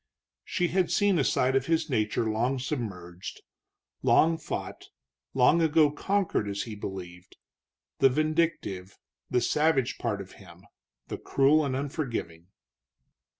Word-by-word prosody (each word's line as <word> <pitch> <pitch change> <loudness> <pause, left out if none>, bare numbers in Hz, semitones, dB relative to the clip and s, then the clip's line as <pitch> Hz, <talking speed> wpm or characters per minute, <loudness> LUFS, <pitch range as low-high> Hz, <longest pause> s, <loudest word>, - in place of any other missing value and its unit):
She 175 -2 -1
had 185 -1 +1
seen 200 -4 +3
a - - +3
side 130 0 +2
of 135 0 +1
his 165 -1 +1
nature 110 -4 0
long 120 +5 0
submerged, 95 - -5 0.6
long 165 0 +4
fought, - - -6 0.5
long 135 +6 +5
ago 155 -2 +4
conquered 190 - 0
as 100 0 -2
he 115 - -7
believed; 90 -3 -8 0.6
the 135 - +6
vindictive, 155 - -1 0.3
the 125 - +2
savage 150 -4 +1
part 110 -4 -2
of 95 -1 -9
him, 85 -1 -15 0.4
the - - -5
cruel 145 +3 +3
and 135 -3 -1
unforgiving. 125 - -4
135 Hz, 130 wpm, -28 LUFS, 105-155 Hz, 0.6 s, the